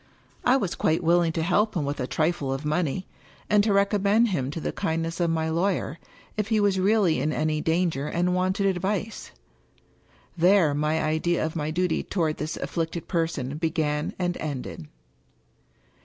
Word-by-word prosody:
I 250 Hz, +2 st, +4 dB
was 195 Hz, -9 st, -2 dB
quite 160 Hz, +2 st, 0 dB
willing 170 Hz, 0 st, +3 dB
to 160 Hz, -, -1 dB
help 205 Hz, +4 st, +1 dB
him 150 Hz, -, 0 dB
with 145 Hz, +1 st, -3 dB
a 125 Hz, -, -2 dB
trifle 155 Hz, -3 st, 0 dB
of 135 Hz, +2 st, -3 dB
money, 160 Hz, +3 st, -1 dB, 0.5 s
and 210 Hz, -1 st, +5 dB
to 215 Hz, -, +1 dB
recommend 200 Hz, +3 st, +3 dB
him 135 Hz, -9 st, -1 dB
to 150 Hz, -, -4 dB
the -, -, -2 dB
kindness 165 Hz, +1 st, -2 dB
of 170 Hz, -1 st, +2 dB
my 160 Hz, -1 st, 0 dB
lawyer, 170 Hz, -2 st, -1 dB, 0.4 s
if 210 Hz, -1 st, 0 dB
he 220 Hz, -1 st, +2 dB
was 200 Hz, -2 st, +2 dB
really 195 Hz, -3 st, +3 dB
in 155 Hz, -, 0 dB
any 155 Hz, 0 st, 0 dB
danger 160 Hz, -3 st, 0 dB
and 175 Hz, +3 st, 0 dB
wanted 185 Hz, +2 st, +1 dB
advice. 195 Hz, +3 st, -1 dB, 1.1 s
There 175 Hz, -3 st, +4 dB
my 150 Hz, +2 st, 0 dB
idea 160 Hz, +2 st, 0 dB
of 160 Hz, -, -4 dB
my 155 Hz, -2 st, -2 dB
duty 180 Hz, +1 st, 0 dB
toward 160 Hz, -5 st, -1 dB
this 155 Hz, +2 st, -4 dB
afflicted 165 Hz, 0 st, -3 dB
person 160 Hz, -6 st, -2 dB
began 155 Hz, -2 st, -1 dB
and 180 Hz, -1 st, -1 dB
ended. 135 Hz, -, -5 dB
170 Hz, 170 wpm, -26 LUFS, 155-190 Hz, 1.1 s, and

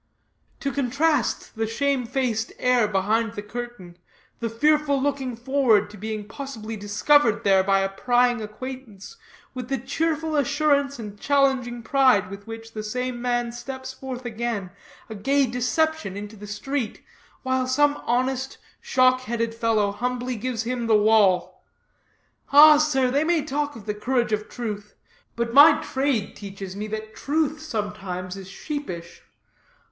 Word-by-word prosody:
To 275 Hz, -, -1 dB
contrast 280 Hz, +3 st, 0 dB
the 225 Hz, 0 st, -1 dB
shamefaced 250 Hz, -2 st, -1 dB
air 250 Hz, -3 st, +3 dB
behind 210 Hz, +3 st, 0 dB
the 205 Hz, -2 st, -6 dB
curtain, 210 Hz, -5 st, -8 dB, 0.4 s
the 230 Hz, -, -2 dB
fearful 295 Hz, +4 st, +2 dB
looking 265 Hz, -3 st, -1 dB
forward 235 Hz, -4 st, +2 dB
to -, -, -11 dB
being 215 Hz, 0 st, -5 dB
possibly 225 Hz, -2 st, -7 dB
discovered 215 Hz, +4 st, +2 dB
there 195 Hz, -2 st, +4 dB
by 195 Hz, 0 st, +3 dB
a 195 Hz, -, 0 dB
prying 245 Hz, +4 st, +2 dB
acquaintance, 235 Hz, -, -8 dB, 0.4 s
with 250 Hz, -2 st, -6 dB
the 270 Hz, -, 0 dB
cheerful 315 Hz, +4 st, -1 dB
assurance 285 Hz, 0 st, +2 dB
and 205 Hz, -3 st, -8 dB
challenging 265 Hz, -4 st, +1 dB
pride 255 Hz, -8 st, +3 dB
with 200 Hz, +2 st, -9 dB
which 225 Hz, 0 st, -8 dB
the 215 Hz, -, -4 dB
same 250 Hz, +3 st, -3 dB
man 240 Hz, -1 st, 0 dB
steps 260 Hz, +2 st, -7 dB
forth 260 Hz, -1 st, -7 dB
again, 225 Hz, -5 st, -3 dB, 0.4 s
a 220 Hz, -, -7 dB
gay 270 Hz, +7 st, +2 dB
deception, 250 Hz, -, -1 dB
into 210 Hz, +1 st, -7 dB
the 210 Hz, 0 st, -10 dB
street, 230 Hz, +3 st, -4 dB, 0.4 s
while 260 Hz, -1 st, 0 dB
some 290 Hz, +3 st, +2 dB
honest, 260 Hz, +2 st, 0 dB, 0.2 s
shock 255 Hz, 0 st, +3 dB
headed 230 Hz, -1 st, -2 dB
fellow 225 Hz, -3 st, +1 dB
humbly 250 Hz, +3 st, -3 dB
gives 235 Hz, 0 st, -3 dB
him 240 Hz, 0 st, -2 dB
the 220 Hz, -1 st, +5 dB
wall! 200 Hz, -4 st, +3 dB, 0.9 s
Ah, 300 Hz, +1 st, +9 dB
sir, 270 Hz, -4 st, +2 dB
they 285 Hz, +3 st, +2 dB
may 325 Hz, -2 st, +1 dB
talk 290 Hz, 0 st, -2 dB
of 215 Hz, -3 st, -11 dB
the 210 Hz, -, -2 dB
courage 240 Hz, +2 st, 0 dB
of 210 Hz, 0 st, -2 dB
truth, 210 Hz, -4 st, -6 dB, 0.4 s
but 235 Hz, 0 st, -2 dB
my 285 Hz, +4 st, +8 dB
trade 265 Hz, -6 st, -1 dB
teaches 195 Hz, -2 st, -8 dB
me 210 Hz, +1 st, -4 dB
that 215 Hz, 0 st, -6 dB
truth 305 Hz, +1 st, -1 dB
sometimes 205 Hz, -9 st, -4 dB
is 195 Hz, -1 st, -9 dB
sheepish. 195 Hz, -, -6 dB
240 Hz, 145 wpm, -24 LUFS, 210-270 Hz, 0.9 s, Ah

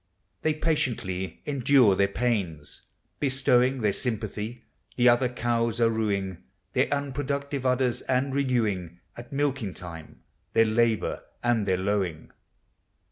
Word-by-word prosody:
They 155 Hz, -1 st, +1 dB
patiently 115 Hz, -, -2 dB
endure 130 Hz, -6 st, +4 dB
their 100 Hz, +1 st, +3 dB
pains. 100 Hz, -10 st, -2 dB, 0.3 s
Bestowing 130 Hz, -2 st, +2 dB
Their 105 Hz, -2 st, +2 dB
sympathy, 110 Hz, 0 st, -3 dB, 0.3 s
the 125 Hz, 0 st, +4 dB
other 120 Hz, +1 st, +4 dB
cows 115 Hz, -1 st, 0 dB
are 115 Hz, -1 st, +4 dB
ruing 100 Hz, -5 st, -1 dB, 0.3 s
Their -, -, +2 dB
unproductive 140 Hz, -1 st, -2 dB
udders, 125 Hz, -1 st, +1 dB
and 130 Hz, +1 st, +1 dB
renewing 110 Hz, -11 st, 0 dB, 0.2 s
At 120 Hz, 0 st, -10 dB
milking 135 Hz, -8 st, -1 dB
time 85 Hz, -3 st, -10 dB, 0.3 s
their 115 Hz, -, +5 dB
labor 110 Hz, 0 st, +1 dB, 0.2 s
and 120 Hz, -4 st, +1 dB
their 95 Hz, -1 st, +2 dB
lowing. 95 Hz, -4 st, -2 dB
120 Hz, 120 wpm, -27 LUFS, 100-130 Hz, 0.3 s, their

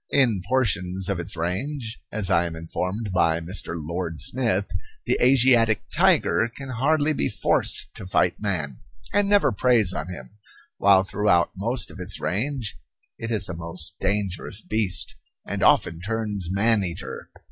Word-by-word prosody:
In 120 Hz, -9 st, +2 dB
portions 95 Hz, -7 st, +1 dB
of 100 Hz, -3 st, -1 dB
its 85 Hz, +1 st, -3 dB
range, 110 Hz, -, -3 dB
as 105 Hz, -2 st, -1 dB
I 85 Hz, -1 st, +3 dB
am 80 Hz, -, -6 dB
informed 90 Hz, +6 st, -4 dB
by 85 Hz, -2 st, +2 dB
Mr. 85 Hz, +1 st, -2 dB
Lord 85 Hz, +1 st, -4 dB
Smith, 115 Hz, -7 st, +1 dB, 0.4 s
the -, -, +2 dB
Asiatic 125 Hz, -4 st, +4 dB
tiger 115 Hz, -, +3 dB
can 140 Hz, -1 st, -7 dB
hardly 145 Hz, +5 st, +1 dB
be -, -, 0 dB
forced -, -, 0 dB
to 95 Hz, -, -8 dB
fight 90 Hz, -1 st, +1 dB
man, 80 Hz, -, -2 dB, 0.4 s
and 205 Hz, 0 st, +2 dB
never 205 Hz, -1 st, +4 dB
preys 110 Hz, -3 st, +3 dB
on 85 Hz, -, -4 dB
him, 105 Hz, +3 st, -10 dB, 0.4 s
while 95 Hz, -1 st, +5 dB
throughout 95 Hz, -3 st, +2 dB
most 115 Hz, +4 st, -1 dB
of -, -, -12 dB
its 90 Hz, +2 st, -2 dB
range 115 Hz, -, -2 dB, 0.4 s
it 115 Hz, -, -4 dB
is 105 Hz, -5 st, +1 dB
a 90 Hz, -, -5 dB
most 85 Hz, 0 st, -5 dB
dangerous 100 Hz, +1 st, -1 dB
beast, 105 Hz, -4 st, -1 dB, 0.3 s
and -, -, -4 dB
often 80 Hz, 0 st, +3 dB
turns 105 Hz, -3 st, -2 dB
man 105 Hz, +2 st, +3 dB
eater. 90 Hz, +1 st, -5 dB
100 Hz, 155 wpm, -24 LUFS, 90-115 Hz, 0.4 s, while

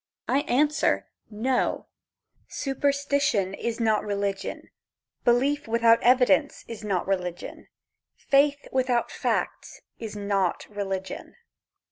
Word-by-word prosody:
I 275 Hz, -, +2 dB
answer, 295 Hz, +4 st, +2 dB, 0.2 s
No 240 Hz, +4 st, -1 dB, 0.6 s
superstition 280 Hz, -7 st, 0 dB
is 235 Hz, +3 st, -3 dB
not 220 Hz, -2 st, +2 dB
religion. 200 Hz, -1 st, -3 dB, 0.5 s
Belief 270 Hz, +4 st, +2 dB
without 230 Hz, 0 st, +4 dB
evidence 260 Hz, +4 st, +3 dB
is 225 Hz, -2 st, -8 dB
not 195 Hz, -4 st, -1 dB
religion. 180 Hz, -3 st, -4 dB, 0.5 s
Faith 285 Hz, 0 st, +2 dB
without 255 Hz, -2 st, +1 dB
facts -, -, -2 dB, 0.2 s
is 220 Hz, -2 st, -6 dB
not 200 Hz, -3 st, -1 dB
religion. 195 Hz, -2 st, -5 dB
230 Hz, 95 wpm, -26 LUFS, 200-275 Hz, 0.6 s, without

